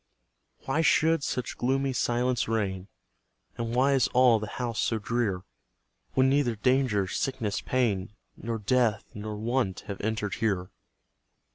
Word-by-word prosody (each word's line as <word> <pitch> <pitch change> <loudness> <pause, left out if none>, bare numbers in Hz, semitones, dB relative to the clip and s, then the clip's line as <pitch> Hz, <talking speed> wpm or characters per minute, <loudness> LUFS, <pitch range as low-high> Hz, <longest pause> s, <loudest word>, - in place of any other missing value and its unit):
Why 150 +4 +1
should 160 0 +3
such 125 - -3
gloomy 135 +2 +1
silence 125 +1 0
reign, 100 -4 -2 0.7
And 115 0 -3
why 135 +3 +4
is 135 -3 +3
all 125 -3 +6
the 105 - -5
house 120 -3 -2
so 115 - +1
drear, 105 -4 -1 0.7
When 130 0 +4
neither 135 -4 +2
danger, 125 -3 +2
sickness, 110 -1 -2
pain, 105 -7 0 0.2
Nor 115 0 -4
death, 110 -1 +1
nor 105 +1 -5
want, 115 -3 -1
have 100 -2 -7
entered 105 -1 -2
here? 95 -5 0
115 Hz, 135 wpm, -28 LUFS, 105-130 Hz, 0.7 s, all